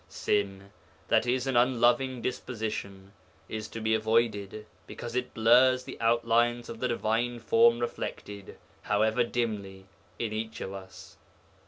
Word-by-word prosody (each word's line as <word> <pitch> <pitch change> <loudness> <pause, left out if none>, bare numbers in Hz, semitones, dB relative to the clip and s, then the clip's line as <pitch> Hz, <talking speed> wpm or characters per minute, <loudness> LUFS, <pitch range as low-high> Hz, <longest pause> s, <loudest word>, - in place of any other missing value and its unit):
Sin 100 -1 -2 0.4
(i.e. 125 +2 +3
an 135 -1 -1
unloving 125 +1 +2
disposition) 105 -6 -5 0.4
is 110 -1 -5
to 115 - -7
be 110 0 0
avoided 110 -2 0 0.2
because 120 0 -7
it 125 0 -2
blurs 125 +3 +5
the - - -8
outlines 115 +1 +2
of 115 - -7
the 125 - 0
Divine 120 +1 -1
Form 115 0 +4
reflected, 105 -4 -6 0.2
however 110 +3 +2
dimly, 105 -5 -3 0.3
in 110 -2 -3
each 110 +1 -4
of 95 - -5
us. 95 -1 -11
115 Hz, 130 wpm, -28 LUFS, 105-120 Hz, 0.4 s, blurs